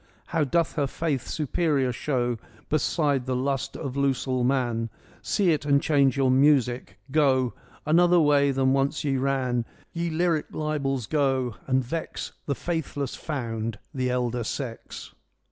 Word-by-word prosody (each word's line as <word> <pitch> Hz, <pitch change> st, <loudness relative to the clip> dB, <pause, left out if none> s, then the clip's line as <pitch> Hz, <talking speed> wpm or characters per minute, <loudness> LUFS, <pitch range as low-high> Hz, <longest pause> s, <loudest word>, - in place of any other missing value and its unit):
How 165 Hz, -2 st, +3 dB
doth 165 Hz, +4 st, +1 dB
her 145 Hz, -2 st, +2 dB
faith 140 Hz, -4 st, -2 dB
superior 150 Hz, -3 st, 0 dB
show 120 Hz, -3 st, -1 dB, 0.3 s
Beside 145 Hz, -3 st, +1 dB
the 130 Hz, -, 0 dB
lust 135 Hz, -1 st, -1 dB
of 140 Hz, -4 st, -4 dB
losel 130 Hz, -2 st, 0 dB
man! 120 Hz, -3 st, 0 dB, 0.3 s
See 190 Hz, -4 st, +2 dB
it, 155 Hz, -, 0 dB
and 140 Hz, -1 st, +4 dB
change 140 Hz, -3 st, +3 dB
your 135 Hz, -2 st, +3 dB
music. 130 Hz, -6 st, +3 dB
Go 130 Hz, -4 st, +3 dB, 0.3 s
Another 175 Hz, +3 st, +5 dB
way 145 Hz, -2 st, +4 dB
than 135 Hz, -1 st, +2 dB
once 135 Hz, +1 st, 0 dB
ye 140 Hz, -2 st, +1 dB
ran, 130 Hz, -3 st, 0 dB, 0.3 s
Ye 170 Hz, 0 st, -1 dB
lyric 165 Hz, -1 st, +1 dB
libels, 140 Hz, -5 st, -1 dB
go, 135 Hz, -3 st, +1 dB
and 130 Hz, -1 st, +2 dB
vex 160 Hz, +7 st, -4 dB, 0.2 s
The 140 Hz, -, 0 dB
faithless 145 Hz, -5 st, -3 dB
found, 115 Hz, -7 st, -4 dB, 0.2 s
the 130 Hz, -1 st, -1 dB
elder 125 Hz, -1 st, -1 dB
sex.' 120 Hz, 0 st, -6 dB
135 Hz, 145 wpm, -26 LUFS, 125-150 Hz, 0.3 s, Another